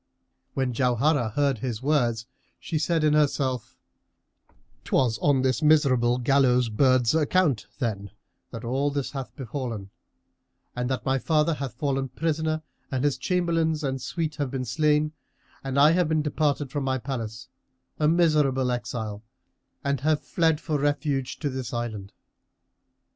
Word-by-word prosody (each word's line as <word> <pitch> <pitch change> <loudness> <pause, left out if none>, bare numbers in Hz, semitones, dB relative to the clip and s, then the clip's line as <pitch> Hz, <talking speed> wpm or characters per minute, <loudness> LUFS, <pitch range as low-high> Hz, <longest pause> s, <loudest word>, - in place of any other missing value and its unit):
When 130 -2 0
Jauharah 125 +1 +2
heard 140 -5 +1
his 120 -1 -4
words, 120 -6 +1 0.3
she 160 - -2
said 165 0 +1
in 150 -1 +4
herself, 135 -5 0 1.1
"'Twas 115 -5 +1
on 135 0 +2
this 130 -2 +1
miserable 130 -6 +4
gallows 125 -2 +3
bird's 130 +1 +3
account, 150 - +2
then, 105 -6 -3 0.4
that 115 +1 -8
all 135 +4 0
this 140 -2 -3
hath 135 -3 -6
befallen 120 -7 -5 0.8
and 125 0 -2
that 130 - -2
my 135 0 +1
father 155 +4 +2
hath 140 -5 -5
fallen 135 0 -1
prisoner 155 +2 -1 0.3
and 130 -1 -2
his 145 -2 +2
chamberlains 165 -4 0
and 135 -1 -2
suite 155 +3 -3
have 145 -3 -1
been 130 0 -3
slain 150 +4 +2 0.5
and 135 0 -1
I 150 +2 +7
have 175 -1 +2
been 155 -1 +1
departed 145 -2 0
from 145 -2 -2
my 130 0 0
palace, 120 -2 -5 0.5
a 150 - +3
miserable 150 -6 +3
exile 120 -4 -4 0.6
and 140 -1 0
have 155 +1 +1
fled 160 -3 +1
for 150 -2 -2
refuge 145 -2 -1
to 145 - 0
this 130 -2 -5
island. 110 -5 -4
135 Hz, 145 wpm, -26 LUFS, 125-150 Hz, 1.1 s, I